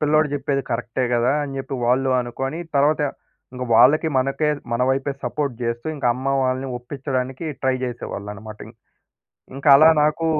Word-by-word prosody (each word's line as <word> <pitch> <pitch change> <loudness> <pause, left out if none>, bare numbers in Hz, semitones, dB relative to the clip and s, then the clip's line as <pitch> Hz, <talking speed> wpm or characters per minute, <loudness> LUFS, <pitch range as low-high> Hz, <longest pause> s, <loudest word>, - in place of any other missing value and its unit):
పిల్లోడు 155 0 +3
జెప్పేది 140 -1 -1
కరెక్టే 120 +2 -2
గదా! 120 +3 +2
అని 135 -1 -5
జెప్పి 135 +1 -5
వాళ్ళు 130 +2 +2
అనుకోని 135 +5 -4 0.2
తరవాత 145 +3 +3 0.5
ఇంగ 125 0 -5
వాళ్ళకి 140 +8 +5
మనకే 135 +4 0 0.2
మన 115 - +1
వైపే 135 +1 -1
సపోర్ట్ 140 +1 -2
జేస్తూ, 115 +2 -3
ఇంక 140 - -2
అమ్మ 130 +2 -6 0.2
వాళ్ళని 130 +1 -1
ఒప్పిచ్చడానికి 130 +2 -4 0.2
ట్రై 130 -1 +2
జేసేవాళ్ళన‌మాట 105 -3 -7
ఇం 110 - -13 0.8
ఇంక 135 +2 -8
అలా 155 +3 +7
నాకు 155 +2 +1
135 Hz, 150 wpm, -22 LUFS, 120-145 Hz, 0.8 s, అలా